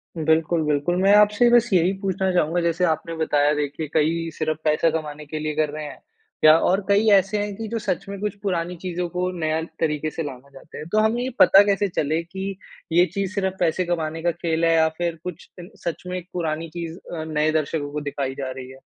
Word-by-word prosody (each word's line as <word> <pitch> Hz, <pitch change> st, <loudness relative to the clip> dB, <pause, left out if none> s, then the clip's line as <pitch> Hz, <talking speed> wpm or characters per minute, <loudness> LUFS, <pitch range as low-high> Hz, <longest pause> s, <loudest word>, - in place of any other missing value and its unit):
बिल्कुल, 160 Hz, +1 st, +1 dB
बिल्कुल, 150 Hz, +4 st, +1 dB
मैं 195 Hz, +1 st, +5 dB
आपसे 210 Hz, +3 st, +5 dB
बस 240 Hz, 0 st, +4 dB
यही 180 Hz, +1 st, +4 dB
पूछना 190 Hz, -1 st, 0 dB
चाहूँगा 175 Hz, 0 st, +1 dB
जैसे 170 Hz, +1 st, 0 dB
आपने 160 Hz, 0 st, -1 dB
बताया 150 Hz, -2 st, +2 dB
देखिए 150 Hz, +1 st, -3 dB
कई 165 Hz, +2 st, +1 dB
सिर्फ़ 155 Hz, -1 st, -1 dB
पैसा 155 Hz, +1 st, +3 dB
कमाने 150 Hz, -1 st, -4 dB
के 155 Hz, +1 st, -5 dB
लिए 155 Hz, -1 st, -3 dB
कर 155 Hz, -1 st, +1 dB
रहे 150 Hz, +1 st, -6 dB
हैं। 145 Hz, -, -9 dB, 0.4 s
या 155 Hz, +1 st, +8 dB
और 190 Hz, +3 st, +2 dB
कई 205 Hz, +2 st, +4 dB
ऐसे 195 Hz, +1 st, +4 dB
हैं 205 Hz, -1 st, -5 dB
कि 220 Hz, 0 st, -6 dB
जो 230 Hz, +1 st, -3 dB
सच 195 Hz, -3 st, -2 dB
में 200 Hz, -, -6 dB
कुछ 210 Hz, -2 st, -2 dB
पुरानी 180 Hz, -2 st, -1 dB
चीजों 180 Hz, -1 st, -3 dB
को 180 Hz, +1 st, -2 dB
नया 155 Hz, 0 st, 0 dB, 0.2 s
तरीके 155 Hz, -1 st, 0 dB
से 165 Hz, -, -4 dB
लाना 140 Hz, -1 st, -8 dB
चाहते 140 Hz, +2 st, -13 dB
है, 150 Hz, -, -7 dB
तो 210 Hz, +7 st, +1 dB
हमें 220 Hz, +3 st, +2 dB
ये 260 Hz, -, -2 dB
पता 195 Hz, +1 st, +8 dB
कैसे 205 Hz, 0 st, +1 dB
चले 160 Hz, -2 st, -1 dB
की 190 Hz, +2 st, -6 dB, 0.3 s
ये 175 Hz, +2 st, +5 dB
चीज़ 200 Hz, 0 st, -2 dB
सिर्फ 190 Hz, -2 st, 0 dB
पैसे 180 Hz, +1 st, +1 dB
कमाने 165 Hz, -2 st, -2 dB
का 175 Hz, -, +2 dB
खेल 165 Hz, -1 st, -1 dB
है 165 Hz, -, +4 dB
या 160 Hz, 0 st, +4 dB
फिर 170 Hz, -1 st, -1 dB
कुछ 180 Hz, -3 st, -8 dB, 0.4 s
सच 170 Hz, -2 st, -3 dB
में 180 Hz, 0 st, -3 dB
पुरानी 165 Hz, -1 st, -3 dB
चीज़ 170 Hz, 0 st, -6 dB, 0.3 s
नए 155 Hz, 0 st, +1 dB
दर्शकों 155 Hz, -1 st, -1 dB
को 150 Hz, 0 st, -4 dB
दिखाई 140 Hz, -2 st, -3 dB
जा 135 Hz, -2 st, -4 dB
रही 130 Hz, -1 st, -8 dB
है। 130 Hz, -, -13 dB
165 Hz, 220 wpm, -23 LUFS, 155-190 Hz, 0.4 s, या